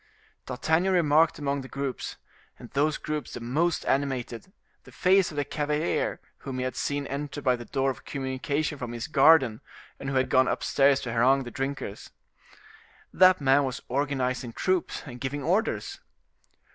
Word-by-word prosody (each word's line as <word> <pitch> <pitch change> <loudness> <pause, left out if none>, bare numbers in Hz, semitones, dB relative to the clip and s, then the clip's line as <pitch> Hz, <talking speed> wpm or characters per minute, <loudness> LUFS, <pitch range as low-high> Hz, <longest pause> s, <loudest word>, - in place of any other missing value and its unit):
D'Artagnan 160 +8 +1
remarked 160 -2 +3
among 140 -1 -2
the 130 - -9
groups, 135 -1 -4 0.4
and 120 - -12
those 150 +2 +1
groups 150 -1 -5
the - - -5
most 150 +9 0
animated, 135 +1 -2 0.3
the - - -15
face 190 0 +3
of 150 - -10
the 145 - 0
cavalier 150 +2 -1 0.2
whom 135 -2 -6
he 125 - -1
had 130 0 -3
seen 145 0 -2
enter 145 +1 -5
by 130 -3 +2
the 120 -1 -9
door 135 +1 0
of 130 - -11
communication 140 +2 -3
from 120 -2 -5
his 120 0 -4
garden, 135 -6 +4 0.4
and 135 - -4
who 135 - -3
had 130 0 +2
gone 130 0 +5
upstairs 140 -1 +2
to 115 - -4
harangue 130 +4 +3
the 120 - -8
drinkers. 135 -6 -5 1.0
That 185 -2 +6
man 135 +1 +4
was 130 -2 -4
organizing 130 -3 -1
troops 185 +4 -1
and 125 -4 -10
giving 140 +2 -3
orders. 195 +9 -1
140 Hz, 165 wpm, -27 LUFS, 130-150 Hz, 1.0 s, That